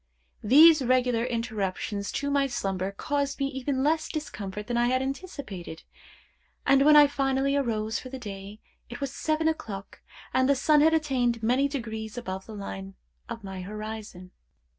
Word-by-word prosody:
These 305 +7 +7
regular 250 -2 +2
interruptions 215 -4 -3
to 285 0 -2
my 280 -1 +2
slumber 195 -6 -2
caused 280 +6 -2
me 275 - +1
even 265 0 -2
less 315 +2 +1
discomfort 210 - -5
than 240 - -3
I 240 0 +3
had 255 +1 +2
anticipated; 265 - -6 0.8
and 275 0 +5
when 300 +1 +7
I 295 -1 +9
finally 275 -1 0
arose 220 -5 -1
for 255 - -9
the 265 - -6
day, 205 -3 -8 0.3
it 240 - -7
was 275 -1 -3
seven 310 +2 0
o'clock, 210 -11 -4 0.3
and 260 +1 +3
the 280 - +5
sun 295 +2 +4
had 320 +1 +5
attained 250 -7 0
many 255 +5 +3
degrees 220 -5 -5
above 190 -5 -5
the 220 - -8
line 95 - -7 0.3
of 230 - -6
my 190 -1 -6
horizon. 210 -2 -7
245 Hz, 160 wpm, -27 LUFS, 210-280 Hz, 0.8 s, I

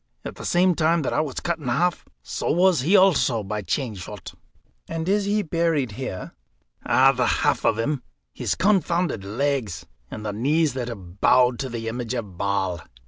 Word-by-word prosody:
At - - -5
the - - -9
same 180 +1 +3
time 165 0 +2
that - - -1
I - - +2
was 145 -4 -4
cut 170 -1 -2
in 145 - -8
half, 170 +9 0 0.2
so - - -3
was 180 -3 +3
he 170 +10 +3
also 150 - +3
by 105 +2 -3
chain 115 - -2
shot." 95 -1 -9 0.5
"And 165 0 -4
is 200 +1 +2
he 205 +1 +1
buried 165 - 0
here?" 105 -4 -6 0.5
"The - - -9 0.5
half - - +2
of 110 - +2
him 130 +4 -1 0.3
his - - -2
confounded 180 - +1
legs, 115 - -2 0.2
and 110 - -7
the 105 - -2
knees 145 +6 +1
that 125 -2 -3
have 95 -5 -9
bowed 125 -1 +4
to 135 - -3
the 115 -1 -5
image 120 +1 -3
of 105 -6 -5
Baal." 95 -3 -1
130 Hz, 185 wpm, -24 LUFS, 105-165 Hz, 0.5 s, bowed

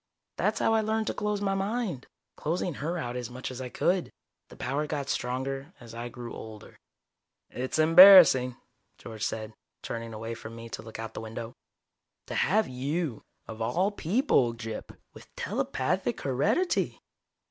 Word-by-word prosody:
That's - - +1
how 225 - +2
I 220 - +4
learned 220 +1 0
to - - -1
close 210 -1 -2
my 195 -1 +1
mind 195 - -2 0.3
closing 170 +2 -2
her 165 +4 -2
out 120 -6 -4
as 125 -2 -4
much 130 +1 -6
as 130 0 -7
I 125 - -5
could. 180 +7 0 0.4
The - - -13
power 145 +3 -2
got 140 -2 -3
stronger 135 +5 -3
as 115 -2 -12
I 120 +1 -5
grew 120 0 -8
older." 110 -1 -10 0.7
"It's 130 +4 -3
embarrassing," 160 -6 +9 0.4
George 110 -2 -8
said, 110 -1 -3 0.3
turning 115 0 -5
away 115 +1 -5
from 115 0 -9
me 115 0 -9
to - - -6
look 110 -1 -9
out 115 0 -6
the - - -6
window. 115 +1 -6 0.7
"To - - -7
have 215 +3 +2
you, 135 0 -2 0.3
of 110 0 -8
all 175 - +1
people, 185 - +2
Gyp, 115 -2 -6 0.2
with - - -15
telepathic - - -1
heredity. 205 - +1
130 Hz, 160 wpm, -28 LUFS, 115-180 Hz, 0.7 s, embarrassing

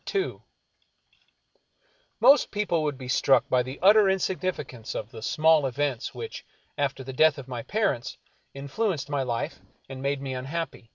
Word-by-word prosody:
II 390 0 -1 1.8
Most 280 +2 +6
people 205 -6 0
would 150 -3 -2
be 130 -1 -8
struck 130 +2 +3
by 125 - +3
the 130 +2 -6
utter 205 0 +7
insignificance 185 - -2
of 110 +2 -5
the 115 -3 -9
small 155 0 +3
events 135 -1 -2
which, 455 - -7 0.3
after 140 -2 -2
the 130 +1 -7
death 155 +3 +4
of 135 -2 -9
my 125 -3 -5
parents, 195 - -1 0.4
influenced 145 +1 -2
my 140 -1 0
life 120 -3 -3 0.3
and 135 -1 -8
made 140 0 -1
me 135 -1 -4
unhappy. 135 -1 -5
140 Hz, 155 wpm, -26 LUFS, 130-170 Hz, 1.8 s, utter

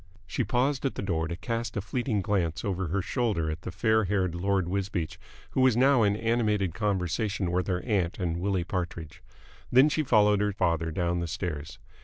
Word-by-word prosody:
She 125 - -1
paused 130 +5 0
at 135 - -1
the - - -4
door 80 -4 -1
to 85 - -4
cast 115 +3 -3
a - - +2
fleeting 110 0 -1
glance 90 -6 -1
over 95 -2 -1
her 95 +4 -1
shoulder 100 - 0
at 80 +1 -6
the - - -6
fair 110 +4 +2
haired 95 -3 0
Lord 95 0 0
Wisbeach, 95 -3 -2 0.3
who 130 - +1
was 130 -3 +4
now 135 0 +5
in 100 -1 +3
animated 105 -5 +1
conversation 95 +1 -1
with 90 +1 0
her 90 -2 0
aunt 95 -6 0
and 85 -3 -1
Willie 95 -1 0
Partridge; 85 -3 -5 0.5
then 130 +5 +6
she 155 - 0
followed 105 -6 +4
her 105 -1 +1
father 85 -4 0
down 85 +2 -1
the 85 - -2
stairs. 80 -3 -4
100 Hz, 195 wpm, -28 LUFS, 85-110 Hz, 0.5 s, then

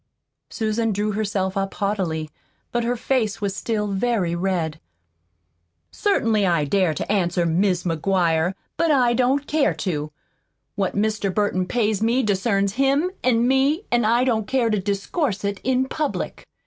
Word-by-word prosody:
Susan 225 0 -1
drew 210 +1 -1
herself 200 -2 -1
up 195 0 -2
haughtily. 185 -6 -1 0.4
But 240 0 0
her 240 +1 0
face 230 -3 0
was 200 -1 -2
still 215 0 -1
very 200 -3 0
red. 170 -3 -1 1.1
"Certainly 225 - +1
I 170 -4 +2
dare 180 +1 +1
to - - -3
answer, 175 -3 +1
Mis' 180 +2 +1
McGuire, 170 0 +1 0.2
but 335 - +2
I 250 -5 +4
don't 260 +3 +1
care 295 -1 +1
to. 155 -5 -3 0.6
What 195 -2 -2
Mr. 210 -1 0
Burton 185 -2 0
pays 215 -2 0
me 235 +4 +2
discerns 200 -1 +1
him 280 +6 +2
an' 240 -1 +3
me 275 +7 +2
an' 240 -1 +3
I 235 +3 +3
don't 225 -5 0
care 255 -4 +1
to 210 - +1
discourse 200 - -2
it 200 -1 -2
in 260 0 +1
public. 300 +2 -4
210 Hz, 150 wpm, -22 LUFS, 190-245 Hz, 1.1 s, I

